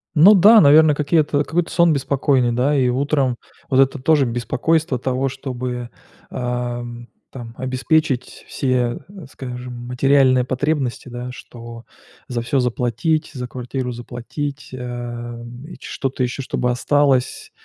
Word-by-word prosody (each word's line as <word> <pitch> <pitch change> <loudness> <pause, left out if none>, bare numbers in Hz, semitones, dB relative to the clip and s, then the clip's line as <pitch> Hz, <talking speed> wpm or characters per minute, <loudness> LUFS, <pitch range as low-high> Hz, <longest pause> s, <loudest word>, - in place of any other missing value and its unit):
Ну 170 +7 +8
да, 210 +4 +7
наверное, 150 -1 +6
какие-то 150 -1 +1
какой-то 170 +3 -1
сон 170 -2 +4
беспокойный, 135 -3 +1
да? 130 +5 +1
И 130 -2 +2
утром 135 -1 0 0.3
вот 130 - +2
это 135 +1 +3
тоже 145 +1 +3
беспокойство 130 +6 0
того, 130 +2 -1
чтобы, 125 -2 -5 0.4
ам 120 -1 -4 0.2
там 120 -3 -9
обеспечить 130 +1 -1
все, 125 -3 -1 0.3
скажем, 125 -1 -7
материальные 130 0 +3
потребности, 130 -1 -2
да- 120 +1 -6
что 115 -1 -11 0.4
за 120 -2 -3
всё 130 +4 0
заплатить, 125 +5 0
за 125 -1 -4
квартиру 125 +1 -4
заплатить, 125 +5 -6
эм, 120 -1 -7 0.2
что-то 135 -1 -3
ещё 125 +2 -3
чтобы 125 -1 -1
осталось 135 0 +1
130 Hz, 120 wpm, -20 LUFS, 120-145 Hz, 0.4 s, Ну